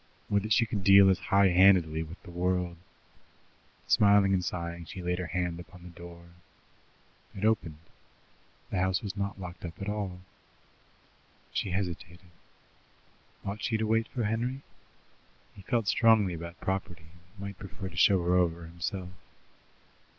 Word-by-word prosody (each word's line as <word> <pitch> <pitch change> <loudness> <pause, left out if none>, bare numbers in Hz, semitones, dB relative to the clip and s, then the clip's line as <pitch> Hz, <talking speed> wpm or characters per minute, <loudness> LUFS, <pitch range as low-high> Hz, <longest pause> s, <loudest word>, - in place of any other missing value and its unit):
Would 100 0 +3
that 110 +2 -6
she 115 +3 +4
could 105 -3 -3
deal 100 0 +8
as 95 - 0
high 100 0 +5
handedly 90 -4 +5
with 80 +3 -8
the 90 - -11
world! 90 0 -1 1.1
Smiling 100 -1 +5
and 90 -2 +1
sighing, 85 -1 -4
she 95 - -9
laid 90 +1 -1
her 90 - -3
hand 90 +1 -2
upon 90 0 -13
the 90 - -10
door. 85 0 -12 1.1
It 100 - -2
opened. 90 -8 +1 0.9
The 95 - 0
house 95 +2 +1
was 100 -1 -5
not 100 -1 -3
locked 90 -1 -8
up 85 -1 -7
at 100 - -5
all. 100 -3 -3 1.3
She - - -1
hesitated. 90 -1 -5 1.1
Ought 100 +2 -4
she 110 - 0
to 110 - -1
wait 115 +1 +1
for 120 - -3
Henry? 120 +5 -2 0.9
He 100 - -12
felt 115 +2 -1
strongly 110 -5 +4
about 85 +1 -8
property, 90 -3 -4 0.2
and 100 +2 -22
might 100 -1 -7
prefer 95 0 -7
to - - -10
show 95 -3 +4
her 90 +1 +1
over 85 -2 +1
himself. 85 +2 -5
95 Hz, 155 wpm, -29 LUFS, 85-100 Hz, 1.3 s, deal